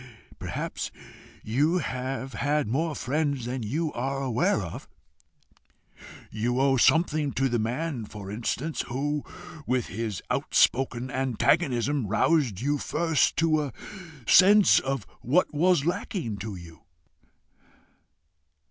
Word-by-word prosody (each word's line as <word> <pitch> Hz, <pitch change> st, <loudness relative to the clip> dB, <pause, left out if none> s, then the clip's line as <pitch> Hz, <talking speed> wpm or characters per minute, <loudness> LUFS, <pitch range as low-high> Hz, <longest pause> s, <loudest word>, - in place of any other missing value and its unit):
"Perhaps -, -, -4 dB, 0.5 s
you 145 Hz, +11 st, +1 dB
have 130 Hz, -3 st, -4 dB
had 145 Hz, -1 st, 0 dB
more 155 Hz, +7 st, -1 dB
friends 140 Hz, -2 st, -1 dB
than 125 Hz, +1 st, -3 dB
you 150 Hz, +9 st, -2 dB
are 135 Hz, +3 st, -2 dB
aware 125 Hz, -4 st, +1 dB
of. 95 Hz, -, -8 dB, 1.4 s
You 120 Hz, +4 st, -1 dB
owe 135 Hz, 0 st, +3 dB
something 155 Hz, +1 st, +3 dB
to 135 Hz, -, +1 dB
the 120 Hz, -2 st, 0 dB
man, 125 Hz, +2 st, -2 dB
for 100 Hz, -2 st, -9 dB
instance, 120 Hz, +8 st, -2 dB
who, 145 Hz, +4 st, -2 dB, 0.4 s
with 125 Hz, -1 st, 0 dB
his 105 Hz, -1 st, -4 dB
outspoken 130 Hz, 0 st, +1 dB
antagonism, 135 Hz, 0 st, +1 dB
roused 115 Hz, -, +1 dB
you 145 Hz, +2 st, 0 dB
first 165 Hz, -1 st, +1 dB
to 160 Hz, -2 st, +3 dB
a 140 Hz, -5 st, -5 dB, 0.5 s
sense 200 Hz, +2 st, +7 dB
of 135 Hz, -6 st, -3 dB, 0.2 s
what 155 Hz, +9 st, +2 dB
was 170 Hz, -1 st, +3 dB
lacking 165 Hz, -, -2 dB
to 105 Hz, 0 st, -6 dB
you." 85 Hz, -2 st, -12 dB
135 Hz, 115 wpm, -27 LUFS, 115-150 Hz, 1.4 s, sense